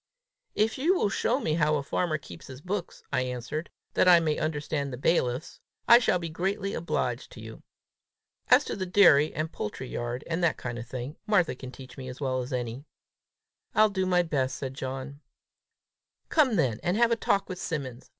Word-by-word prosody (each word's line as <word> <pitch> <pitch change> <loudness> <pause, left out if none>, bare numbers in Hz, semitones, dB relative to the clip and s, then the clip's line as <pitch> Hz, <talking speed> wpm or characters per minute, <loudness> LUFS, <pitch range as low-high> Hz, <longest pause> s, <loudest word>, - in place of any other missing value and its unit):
"If 220 +4 +1
you 340 +8 +3
will 210 - +1
show 245 +5 +1
me 160 - -1
how 155 -1 +2
a 145 - -1
farmer 155 +2 0
keeps 85 - -12
his 130 -1 -9
books," 180 +3 -5
I 130 - +2
answered, 125 +6 -4 0.2
"that - - +3
I 175 -1 +8
may 155 -2 0
understand 150 -2 -2
the 125 - -5
bailiff's, 130 -1 0 0.3
I 235 - +9
shall 225 -6 +2
be 170 -1 -4
greatly 195 +5 -2
obliged 170 - -2
to - - -11
you. - - -10 0.9
As - - +6
to - - -3
the 185 -1 -3
dairy, 155 -6 +6
and 155 +1 -3
poultry 125 +5 -5
yard, 120 +2 -4
and 170 +1 -2
that 165 - +2
kind 120 -1 -5
of 120 - -8
thing, 130 +4 -6
Martha 190 -8 +3
can 130 0 -9
teach 130 0 -12
me 130 - -7
as 125 - -9
well 130 -2 -1
as 125 +3 -7
any." 125 +1 -3 0.9
"I'll 215 0 +5
do 190 -1 -1
my 180 -1 +3
best," 140 -6 -1
said 135 -1 -5
John. 135 +2 -6 1.1
"Come 305 -4 +5
along 225 -5 -1
then, 125 -9 +1
and 175 +3 0
have 235 0 +4
a - - +4
talk 200 -3 0
with 185 -1 -6
Simmons! 135 -9 -5
155 Hz, 200 wpm, -28 LUFS, 130-185 Hz, 1.1 s, I